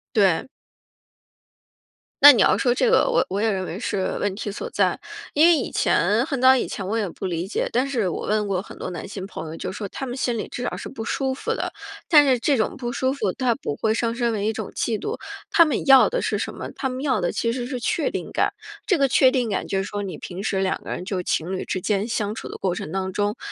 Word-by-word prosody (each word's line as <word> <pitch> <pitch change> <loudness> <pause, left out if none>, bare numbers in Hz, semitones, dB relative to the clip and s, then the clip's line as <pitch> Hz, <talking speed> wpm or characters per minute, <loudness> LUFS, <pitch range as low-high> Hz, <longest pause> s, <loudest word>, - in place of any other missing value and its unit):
对。 195 +2 +3 1.7
那 290 0 +12
你 240 - +2
要 - - +4
说 245 -2 +2
这 - - +2
个 475 - +4
我 - - +2
我 195 +2 -1
也 225 - +2
认 190 -3 -1
为 180 +2 -6
是 200 -5 -2
问 200 -2 -1
题 205 0 -4
所 345 - -6
在， - - +1 0.3
因 305 +3 +6
为 345 - +6
以 280 - -2
前， 210 +8 +2
很 275 -3 -3
早 260 0 +8
以 255 - 0
前 195 - -5
我 210 +4 -1
也 215 -3 0
不 180 - -7
理 175 -1 -2
解， 200 - -2
但 255 +3 +1
是 235 -9 0
我 - - -4
问 210 0 +1
过 190 -2 0
很 - - -12
多 - - -5
男 175 - -6
性 190 -1 -6
朋 195 - -7
友 160 - -7
就 - - -5
说 200 +1 -5
他 270 - -6
们 250 0 -5
心 240 -3 -1
里 - - -3
至 250 - -5
少 - - -2
是 - - -7
不 225 -4 -7
舒 265 +2 -1
服 260 - -2
的。 - - -3 0.4
但 300 -4 +7
是 260 -2 +3
这 275 +3 +1
种 220 - 0
不 240 -3 -4
舒 260 0 0
服 215 -9 -1
它 245 +2 0
不 275 - -4
会 220 -1 +1
上 230 0 0
升 235 -1 0
为 205 -2 -2
一 220 - +2
种 220 - -5
嫉 220 -3 -1
妒， 430 - -4 0.3
他 345 - +6
们 305 - -1
要 270 -2 +7
的 - - -1
是 - - 0
什 - - -3
么？ - - -7
他 265 - -2
们 255 +1 -5
要 260 -8 +1
的 175 - 0
其 230 0 -1
实 245 -1 -3
是 255 0 -4
确 305 +6 0
定 - - -5
感， - - +1 0.3
这 380 - +2
个 275 -2 +3
确 260 +1 +5
定 250 -4 0
感 200 - -1
就 195 - -1
是 195 - -1
说 205 0 -4
你 195 - -5
平 185 +2 -7
时 195 -3 0
两 190 -1 -1
个 - - -9
人 180 - -4
就 185 -2 -2
情 175 +1 -1
侣 - - -4
之 185 - -3
间 200 +2 0
相 215 -2 -2
处 - - -7
的 - - -7
过 185 -2 -1
程 155 - -6
当 190 0 -3
中， 205 +1 -1
225 Hz, 290 characters per minute, -23 LUFS, 195-260 Hz, 1.7 s, 那